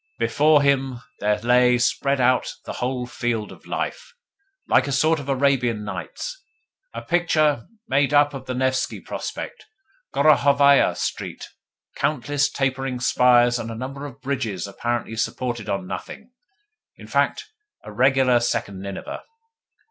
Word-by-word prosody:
Before 145 +5 +3
him 135 -3 +1 0.2
there 105 0 +1
lay 125 +1 +4
spread 140 +3 +1
out 125 0 +2
the - - -5
whole 125 0 -1
field 120 -3 -3
of - - -15
life, 480 - -4 0.5
like - - +3
a - - -2
sort 155 +3 +2
of 140 -1 -8
Arabian 130 -5 +1
Nights - - -6 0.5
a - - -7
picture 155 -7 +1 0.2
made 140 - +2
up 145 0 +4
of 130 -1 -8
the 130 - -3
Nevski 130 0 0
Prospect, - - -7 0.4
Gorokhovaia 140 -1 +4
Street, - - -4 0.5
countless 145 0 0
tapering 135 -2 -2
spires, 120 -1 +4
and 115 - -5
a 115 - -5
number 135 +4 -6
of 135 0 -13
bridges 120 -10 -2
apparently 115 +3 -3
supported 120 -1 -3
on 100 -1 -2
nothing 215 - -8 0.7
in - - -12
fact, - - 0 0.4
a 105 - -9
regular 130 +2 +3
second 100 -4 -2
Nineveh. 100 0 -6
130 Hz, 135 wpm, -23 LUFS, 120-140 Hz, 0.7 s, lay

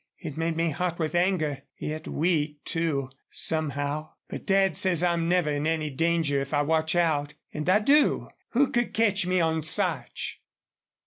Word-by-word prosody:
It 155 -4 -7
made 165 0 -1
me 165 -1 +1
hot 175 +3 -2
with 160 -1 -2
anger, 175 -6 +1 0.2
yet 155 +1 -5
weak, 150 -3 0
too, 150 -6 -1 0.2
somehow. 150 -1 -1 0.2
But - - -7
Dad 195 -1 +3
says 180 -3 +2
I'm 170 -1 +1
never 175 -4 +2
in 145 +1 -1
any 155 -2 -1
danger 160 -1 +1
if 140 +2 -3
I 145 - +3
watch 160 +2 +1
out. 150 -4 +1 0.2
And 150 +3 -2
I 190 - +6
do. 285 +6 +3 0.2
Who 265 +3 +3
could 240 0 0
catch 205 -4 +2
me 185 0 +2
on 160 -1 +1
Sarch?" 155 - -2
160 Hz, 170 wpm, -27 LUFS, 150-180 Hz, 0.2 s, I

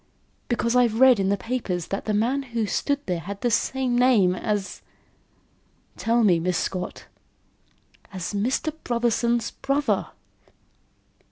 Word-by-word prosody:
"Because 235 0 0
I've 235 -3 +3
read 260 -4 +7
in 195 0 +1
the 200 - +1
papers 205 -7 -3
that 195 - -3
the 215 - -1
man 245 +6 +1
who 235 -4 -3
stood 285 +7 -1
there 180 -2 -2
had 195 +4 -7
the 240 - +1
same 255 +2 0
name 240 -7 +4
as 200 +1 -3 0.6
" - - -40
"Tell 230 +1 +1
me, 180 -5 +4
Miss 180 +1 0
Scott." 180 -1 -4 1.1
"As 185 0 -5
Mr. 250 +9 -1
Brotherson's 235 0 0
brother." 280 +1 -1
230 Hz, 140 wpm, -24 LUFS, 195-250 Hz, 1.1 s, read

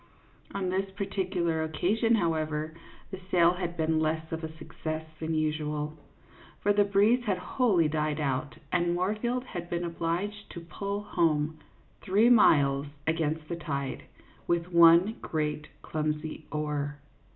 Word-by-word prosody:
On 190 -2 -1
this 190 +1 -1
particular 185 -4 -1
occasion, 200 +9 +1
however, 155 -4 -1 0.4
the 190 - -6
sail 170 -2 +5
had 175 -1 -4
been 160 0 +1
less 160 0 -1
of 165 0 -4
a 160 - -4
success 160 0 -5
than 160 0 -2
usual, 150 -1 -1 0.7
for 205 - +3
the 205 0 +4
breeze 205 +5 +3
had 195 -3 +1
wholly 180 - +2
died 150 0 -1
out, 135 -3 -2
and 175 -1 +2
Moorfield 215 +7 -1
had 175 -8 -7
been 175 0 -2
obliged 175 +5 -3
to 170 - -6
pull 200 +5 -4
home, 155 -5 +1 0.4
three 210 +6 +4
miles 140 - +5 0.2
against 160 -1 -1
the 170 - -3
tide, 140 -5 -4 0.5
with 170 +1 0
one 170 +5 +6
great 150 -1 -2 0.2
clumsy 155 0 -3
oar. 150 -1 -2
165 Hz, 140 wpm, -29 LUFS, 155-190 Hz, 0.7 s, one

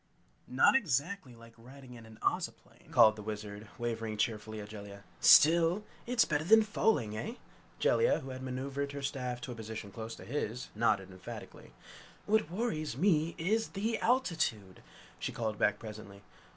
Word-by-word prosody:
"Not 130 - +4
exactly 160 - 0
like 115 0 -15
riding 130 +2 -13
in 115 -2 -12
an 110 0 -14
Ozoplane!" - - -3
called 110 -1 +6
the 105 - -8
Wizard, 105 0 -6
waving 115 -2 -3
cheerfully 110 -1 -2
to 105 - -6
Jellia! 100 -1 -10 0.2
"Still 170 +5 +6 0.2
it's 245 -1 +3
better 150 -1 0
than 220 +6 +6
falling, 205 - +1
eh?" 225 - -4 0.4
Jellia, 470 +2 +3
who 135 - -7
had 130 0 -7
maneuvered 135 +2 -4
her 140 -1 -6
staff 125 -2 -3
to 130 - -6
a - - -6
position 110 -2 -7
close 115 +2 -7
to - - -12
his, 125 -2 -3
nodded 100 -4 +1
emphatically. 95 0 -10 0.5
"What 215 -6 +2
worries 165 - -2
me, 165 -1 +2
is 215 +7 0
the 220 +3 0
altitude!" 160 - 0 0.4
she - - -3
called 110 -3 -3
back 105 - +3
presently. 105 -2 -10
125 Hz, 160 wpm, -32 LUFS, 110-165 Hz, 0.5 s, called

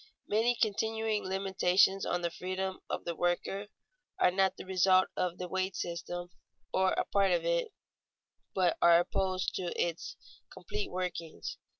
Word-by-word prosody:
_Many 230 +3 +2
continuing 220 0 0
limitations 190 0 +2
on 175 0 -1
the 170 - 0
freedom 185 +2 -3
of - - -3
the 170 - -3
worker 175 +4 -1 0.5
are 180 - +4
not 190 +1 +2
the - - -8
results 185 0 +4
of 180 -1 -1
the 180 - -4
wage 190 +1 -2
system 175 +1 -4 0.4
or 190 0 +3
a - - 0
part 200 -1 +2
of 170 -2 +1
it, 170 0 +1 0.8
but 180 -3 +2
are 170 0 +7
opposed 185 +1 -1
to 185 - -3
its 170 -1 -2 0.4
complete 420 -2 -5
workings. 180 -3 -4
185 Hz, 150 wpm, -31 LUFS, 175-195 Hz, 0.8 s, are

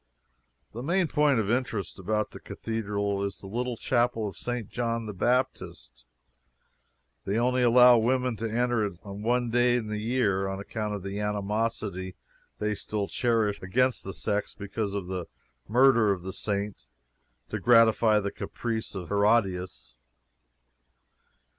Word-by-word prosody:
The 115 - -6
main 175 +6 +1
point 150 -3 +3
of 110 -1 0
interest 120 -6 -2
about 105 +3 -1
the - - -10
cathedral 100 -3 -3
is 100 -1 -3
the - - -13
little 120 +4 -3
Chapel 120 -3 +1
of 100 - -7
St. 120 -4 -4
John 115 -1 -2
the 105 - -5
Baptist. 100 - -2 1.2
They 100 +3 -1
only 125 +2 +2
allow 125 0 +7
women 125 +1 +1
to 115 +1 -3
enter 120 0 +1
it 100 -4 -3
on 100 0 -8
one 120 +1 +1
day 120 +1 +3
in 115 -3 -2
the 105 0 -2
year, 105 -4 +1
on 95 0 -4
account 105 +1 -4
of 100 - -7
the 100 +1 -4
animosity 105 -2 -2 0.4
they 105 0 -1
still 105 0 -3
cherish 115 -4 0
against 125 +7 +1
the 95 - -5
sex 105 +1 -2
because 100 0 -4
of 100 -3 -3
the 90 -2 -4 0.4
murder 120 -2 +5
of 90 -3 -2
the 95 0 -5
Saint 100 -5 -3 0.6
to - - -3
gratify 115 -2 +5
a 100 -1 -1
caprice 115 -3 -4
of 90 -3 -6
Herodias. 100 - +1
110 Hz, 150 wpm, -27 LUFS, 100-120 Hz, 1.2 s, allow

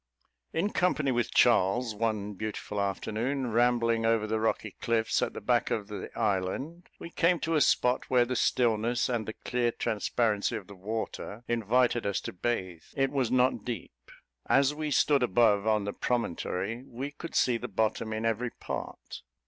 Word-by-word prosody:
In 200 +6 0
company 155 -6 +1
with 120 -2 0
Charles, 110 +5 +3
one 105 -1 -2
beautiful 105 0 -4
afternoon, 115 +6 -2
rambling 115 -1 +2
over 115 -1 +2
the 110 +1 -1
rocky 110 -1 -1
cliffs 115 -1 +1
at - - -1
the - - -7
back - - +1
of 105 -1 -2
the 105 -2 -6
island, 110 - -2
we 170 - -9
came 170 +1 +2
to 165 - -1
a 155 - +3
spot 125 -1 +2
where 125 -1 +4
the 125 +1 -3
stillness, 120 0 +1
and 115 -4 -1
the 110 - -4
clear 120 -1 +1
transparency 110 0 0
of 105 -4 -5
the 100 - -12
water 110 +2 -5
invited 120 0 +2
us 100 -1 0
to - - -6
bathe. 95 -5 -2
It 135 0 +1
was 135 -5 0
not 130 +1 +2
deep. 85 - -7 0.4
As 140 +1 +4
we 155 0 -3
stood 145 -1 +3
above, 110 -2 +3
on 105 -1 +2
the 100 - -3
promontory, 115 -1 -2
we 135 +4 -5
could 165 +3 -9
see 125 -2 +3
the 125 - -5
bottom 110 +1 -1
in 110 +1 -2
every 115 +2 0
part. - - -7
115 Hz, 175 wpm, -29 LUFS, 105-125 Hz, 0.4 s, where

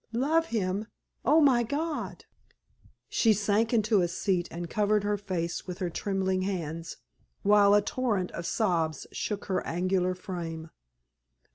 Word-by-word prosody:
"Love 310 +7 +2
him! 200 -1 -1 0.4
Oh, 300 +6 +5
my 260 -5 +5
God!" 295 +6 -3 0.8
She 225 -2 +3
sank 210 +2 +1
into 215 -3 +3
a 175 - +2
seat 175 0 -1
and 170 +1 -5
covered 210 +2 +1
her 205 0 +1
face 185 -5 -3
with 180 -1 -5
her 180 -3 -2
trembling 190 0 -1
hands, 165 -4 -4 0.5
while 205 0 +6
a 205 - +4
torrent 210 -7 -1
of 170 - -5
sobs 165 - 0
shook 205 -1 -3
her 185 -2 -1
angular 185 +1 0
frame. 165 -4 -6
195 Hz, 140 wpm, -28 LUFS, 180-215 Hz, 0.8 s, while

